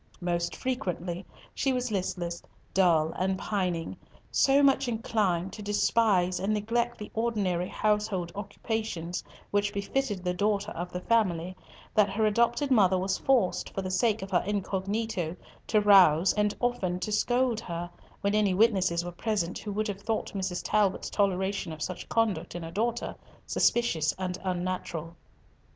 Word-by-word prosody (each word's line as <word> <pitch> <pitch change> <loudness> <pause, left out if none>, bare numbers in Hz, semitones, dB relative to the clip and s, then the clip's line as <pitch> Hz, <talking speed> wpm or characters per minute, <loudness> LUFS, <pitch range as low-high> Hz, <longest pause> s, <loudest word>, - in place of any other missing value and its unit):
Most 175 -1 -1
frequently 185 -8 -3 0.3
she 270 - 0
was 250 -2 -1
listless, 180 -3 -2 0.3
dull, 165 -4 +3
and 190 +1 +1
pining, 180 -5 -2 0.4
so 275 +1 +4
much 270 -1 +4
inclined 200 -6 0
to 215 - -8
despise 205 -3 +2
and 195 +2 0
neglect 235 +3 -1
the 210 - -8
ordinary 205 -6 0
household 210 -5 0
occupations 205 -3 -4 0.3
which 205 0 +1
befitted 205 0 -2
the 180 -1 0
daughter 205 +2 0
of 175 0 -5
the 180 - -4
family, 185 -5 +1 0.4
that 210 -2 +4
her 215 +3 +1
adopted 235 +6 +2
mother 190 -6 +5
was 190 +1 -1
forced, 210 -9 +2
for 195 - -2
the 185 - -3
sake 210 +2 +1
of 195 - -8
her 175 - +3
incognito, 200 -2 -2 0.3
to 215 - +3
rouse, 190 -4 +6
and 210 -1 +1
often 195 -8 0
to 215 - -3
scold 240 +2 +2
her 175 -5 -5 0.3
when 200 0 +1
any 210 -3 +3
witnesses 190 -5 +3
were 175 - -4
present 185 -1 -2
who 210 - -5
would 215 +2 -1
have 200 -1 -5
thought 220 +2 -2
Mrs. 190 -3 -2
Talbot's 205 -3 +1
toleration 190 -3 0
of 155 -1 -5
such 185 - -5
conduct 225 -6 0
in 175 - -5
a 165 - -6
daughter 235 +6 -1 0.3
suspicious 165 -11 +2
and 185 -1 -3
unnatural. 180 -3 -3
195 Hz, 155 wpm, -28 LUFS, 180-220 Hz, 0.4 s, rouse